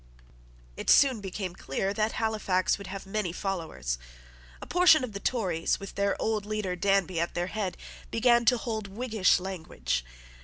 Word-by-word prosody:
It - - -3
soon 260 -6 +5
became 190 -1 -4
clear 195 +5 -2
that 215 +1 0
Halifax 210 -5 0
would 200 - -8
have 195 +1 -6
many 195 -2 -2
followers. 160 - -3 0.6
A - - -8
portion 355 -5 +5
of 240 -4 -5
the 200 - -4
Tories, 185 -9 0
with 195 -1 -8
their 200 0 0
old 220 -2 0
leader, 210 -3 -2
Danby, 190 -2 +1
at 170 - -2
their 175 - 0
head, 200 -4 -2 0.3
began 240 +1 +4
to 245 +2 +5
hold 220 -3 -4
Whiggish 215 -2 +2
language. 160 - -3
200 Hz, 160 wpm, -28 LUFS, 185-220 Hz, 0.6 s, soon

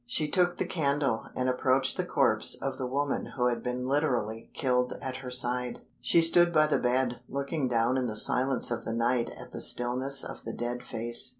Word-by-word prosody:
She 150 +5 0
took 175 +2 +1
the - - -1
candle, 140 -7 -1
and 130 - -1
approached 130 +1 +1
the - - -1
corpse - - +2
of - - -5
the 130 - -2
woman 140 +2 -2
who 125 - +1
had 120 -2 0
been 125 +1 -3
literally 125 -6 -1
killed 125 -2 0
at 130 -1 -5
her 130 -1 -8
side. 125 0 -1 0.2
She 170 - +3
stood 175 +1 +4
by 155 -2 +4
the 150 - +1
bed, 125 -1 0
looking 140 +1 -2
down 120 +1 +1
in 130 -1 -1
the 110 - -4
silence 125 +4 +4
of 120 - -3
the 115 - -4
night 120 +1 0
at - - -11
the - - -6
stillness 130 +3 +1
of - - -8
the 115 - -6
dead 120 +1 -4
face. 120 +2 +1
125 Hz, 205 wpm, -28 LUFS, 120-140 Hz, 0.2 s, stood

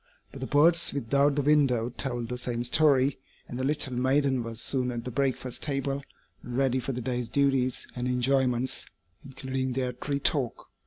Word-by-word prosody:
But - - -10
the - - -3
birds 165 +4 +4
without 140 +2 +2
the 145 - 0
window 135 -5 +3
told 120 -2 -4
the 125 - -3
same 120 -1 -3
story, 135 0 +3 0.3
and 120 - -6
the - - -1
little 135 -2 -1
maiden 130 +1 +2
was 115 -1 -5
soon 130 -1 +1
at 120 -1 -5
the 125 - -4
breakfast 130 -1 -2
table 140 -1 -2 0.4
and 125 0 -6
ready 130 -1 +2
for 130 - -3
the 125 -1 -4
day's 125 -1 -3
duties 135 -3 +1
and 125 0 -2
enjoyments, 125 0 +1 0.4
including 130 -1 -4
their 125 -1 -1
"tree 140 +3 -3
talk." 135 -4 -1
130 Hz, 175 wpm, -28 LUFS, 125-140 Hz, 0.4 s, birds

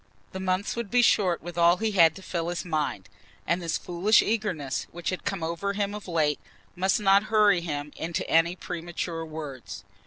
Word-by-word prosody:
The 190 - -6
months 190 +1 -1
would 235 -3 -4
be 245 +2 +4
short 185 -8 +3
with 175 0 -6
all 170 +1 +5
he 220 +1 -1
had 165 -5 +5
to 190 - -11
fill 170 -2 -3
his 175 +1 -4
mind, 150 - -2 0.4
and 175 +2 0
this 165 -2 -1
foolish 180 +5 +3
eagerness 185 -11 -2
which 175 +1 -3
had 185 - -5
come 190 -4 -2
over 170 +5 -2
him 200 0 -1
of 210 -1 -8
late 155 -4 +1 0.4
must 190 +3 +1
not 200 0 +4
hurry 210 -5 +4
him 145 -3 -4
into 165 +1 -3
any 165 +2 +3
premature 170 -1 -5
words. 155 -5 -8
175 Hz, 190 wpm, -26 LUFS, 165-200 Hz, 0.4 s, all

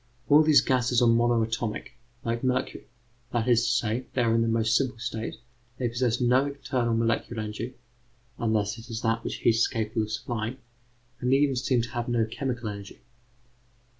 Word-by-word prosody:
All 150 +1 +8
these 155 -2 +6
gases 125 -2 +2
are - - +5
monoatomic, 115 -2 +1 0.3
like 115 +1 -2
mercury; 125 -1 -1 0.4
that 120 0 0
is 120 -1 +4
to - - +1
say, 115 +3 0
they 125 - +1
are 115 -1 +2
in 115 - +3
the 115 - +1
most 115 0 +2
simple 130 -4 +1
state, 115 -1 -4 0.4
they 125 -2 -1
possess 120 0 0
no 125 +3 +3
internal 130 -4 -1
molecular 115 0 0
energy 110 +4 -5 0.6
(unless 110 -1 0
it 115 +2 -12
is 115 0 -4
that 115 0 0
which - - -3
heat 115 - +3
is 115 - +4
capable 110 -2 -2
of 110 0 -3
supplying), 115 +1 -3 0.6
and 125 0 0
they 135 - +6
even 140 -1 +2
seem 125 -1 +1
to 120 - -6
have 120 -1 -3
no 120 -2 +2
chemical 120 0 -4
energy. 100 -1 -9
115 Hz, 185 wpm, -27 LUFS, 115-125 Hz, 0.6 s, All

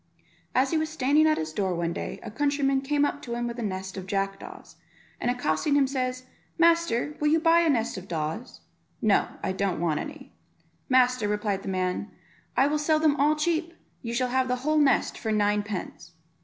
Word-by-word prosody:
As 265 +1 +3
he 320 - +2
was 315 0 -1
standing 305 +1 +3
at 310 - +3
his 155 0 -4
door 190 -2 -1
one 170 0 -1
day - - -5
a - - -7
countryman 280 +1 +1
came 290 +1 +1
up 290 - -3
to 235 -1 -5
him 240 0 -2
with 235 0 -5
a - - -2
nest 190 -2 -4
of 190 -1 -6
jackdaws, 195 0 -4 0.4
and 240 - -1
accosting 245 - 0
him, 285 -1 +4
says, 255 -1 -2 0.3
"Master, 335 -5 +2
will 300 - +1
you 320 +2 +4
buy 330 +1 +5
a 335 -1 +3
nest 235 -7 0
of 185 - -13
daws?" 160 +7 -4 0.4
"No, 215 -4 +3 0.2
I 190 - 0
don't 190 -2 -1
want 160 -3 0
any." - - -8 0.6
"Master," 255 -3 +3
replied 205 -1 -1
the - - -6
man, 185 +2 -2 0.5
"I 265 - +5
will 300 +1 +1
sell 310 +1 +2
them 310 -2 +3
all 295 +2 +3
cheap; 330 +2 -1 0.3
you 235 0 -4
shall 255 0 0
have 260 +1 +1
the 250 - +1
whole 310 0 +3
nest 285 -2 +2
for 220 - -2
nine 210 -1 +2
pence." 200 -3 -7
250 Hz, 205 wpm, -26 LUFS, 200-295 Hz, 0.6 s, buy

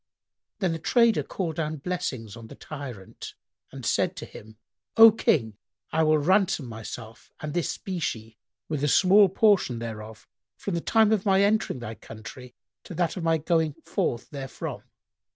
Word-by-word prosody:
Then 190 -5 0
the 165 - -3
trader 235 +6 +3
called 165 -5 -4
down 155 -1 -2
blessings 135 - -4
on 115 -1 -11
the - - -11
tyrant 130 -10 -9 0.4
and - - -8
said - - +1
to - - -7
him, 110 +1 -13 0.4
"O 225 0 +11
King, 115 - +1 0.3
I 160 - +1
will 155 -1 +4
ransom 185 -1 +2
myself 115 0 -9
and 150 -1 -5
this 175 -2 -1
specie 115 - -4 0.3
with 150 -3 -3
a - - +3
small 195 +5 +6
portion 195 - +3
thereof, 110 -2 -8 0.3
from 200 - -4
the 170 - -1
time 220 +2 +3
of 210 -3 +2
my 195 -1 +4
entering 210 -7 +1
thy 120 -2 -6
country 115 +3 -11 0.3
to 175 - -8
that 170 -1 0
of 185 - -5
my 165 0 +3
going 160 -1 0
forth 120 - -2
therefrom." 135 -2 -6
155 Hz, 165 wpm, -26 LUFS, 115-185 Hz, 0.4 s, O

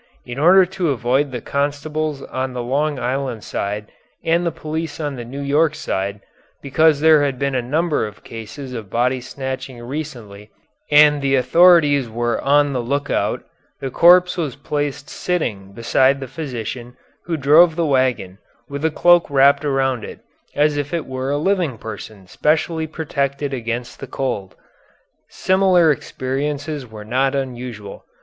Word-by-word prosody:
In 120 +2 -6
order 185 +5 +6
to 180 -2 -2
avoid 135 +2 +1
the 125 -3 -5
constables 145 +1 -2
on 130 0 -4
the 125 -1 -4
Long 145 +4 0
Island 130 -2 -3
side 105 +1 -4 0.3
and 170 +1 +2
the 170 - 0
police 160 +1 -5
on 145 -3 -3
the 120 - -6
New 135 +4 -7
York 150 +3 +2
side, 100 -8 -3 0.4
because 150 +1 +2
there 155 -1 +6
had 140 -3 -1
been 140 +1 -1
a 130 - 0
number 150 +1 0
of 105 - -13
cases 115 +4 -8
of 110 -5 -7
body 125 +4 0
snatching 130 0 -6
recently 120 -7 -7 0.4
and 150 0 +6
the 135 0 +2
authorities 145 -1 +5
were 120 +1 -1
on 145 +1 +3
the 125 - -1
lookout, 140 +4 -1 0.4
the 135 -1 -4
corpse 180 +4 +5
was 155 -6 -2
placed 145 0 -3
sitting 105 - -3
beside 130 +5 +2
the 135 - -6
physician 125 -3 -6 0.3
who 170 -2 -2
drove 155 +4 +5
the 170 -1 0
wagon, 130 -9 0 0.3
with 140 +1 -6
a 160 - +3
cloak 175 +2 +4
wrapped 140 +1 +4
around 135 -4 0
it, - - -9 0.3
as 150 0 +2
if 145 +3 -2
it 165 - -3
were 130 0 -4
a 145 - 0
living 170 - 0
person 110 -2 -9
specially 160 - 0
protected 140 -3 -3
against 120 -1 -4
the 135 - -7
cold. 105 -8 -4 0.7
Similar 185 -4 +3
experiences 145 +1 -3
were 110 -1 -10
not 130 +4 +1
unusual. 125 -6 -6
140 Hz, 155 wpm, -20 LUFS, 125-155 Hz, 0.7 s, order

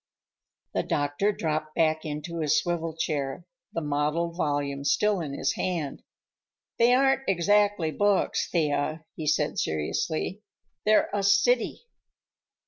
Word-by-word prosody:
The - - +1
doctor 145 +8 0
dropped 155 -4 -3
back 160 -1 +1
into 155 +3 -5
his 150 -3 +2
swivel 165 -2 -2
chair, 150 0 -2 0.3
the 165 - -3
mottled 150 +3 -1
volume 145 -4 -1
still 205 +8 +2
in 145 -4 -5
his 135 - 0
hand. 165 -6 -3 0.8
"They 235 +1 +5
aren't 270 +1 +4
exactly 200 -1 +2
books, 205 +3 +1
Thea," 155 -1 0
he 155 - -5
said 150 - +1
seriously. 155 - -2 0.5
"They're 215 0 +4
a 205 - +1
city." 465 - +2
160 Hz, 125 wpm, -27 LUFS, 150-195 Hz, 0.8 s, They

